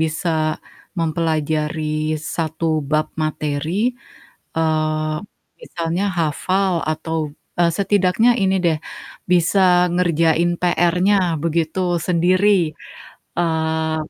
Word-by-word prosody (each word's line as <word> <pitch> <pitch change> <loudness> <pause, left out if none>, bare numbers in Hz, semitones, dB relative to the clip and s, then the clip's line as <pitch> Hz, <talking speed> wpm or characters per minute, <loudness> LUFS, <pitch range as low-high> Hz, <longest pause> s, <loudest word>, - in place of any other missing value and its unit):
bisa 160 +2 -1 0.7
mempelajari 155 -1 -1 0.2
1 160 0 -2 0.2
bab 155 0 +2 0.2
materi, 155 -1 -2 0.9
eee, 155 -1 0 0.4
misalnya 170 +2 -3 0.2
hafal 185 +5 0 0.2
atau, 160 +1 -3 0.4
eee, 170 -1 +4
setidaknya 200 +2 +3
ini 190 0 +2
deh, 165 -2 +2 0.5
bisa 180 +2 +3 0.3
ngerjain 170 -1 +2
PR-nya 180 +2 +2 0.3
begitu 165 +1 -1 0.3
sendiri, 180 +3 +3 0.9
eee, 160 -1 0
165 Hz, 80 wpm, -20 LUFS, 155-175 Hz, 0.9 s, eee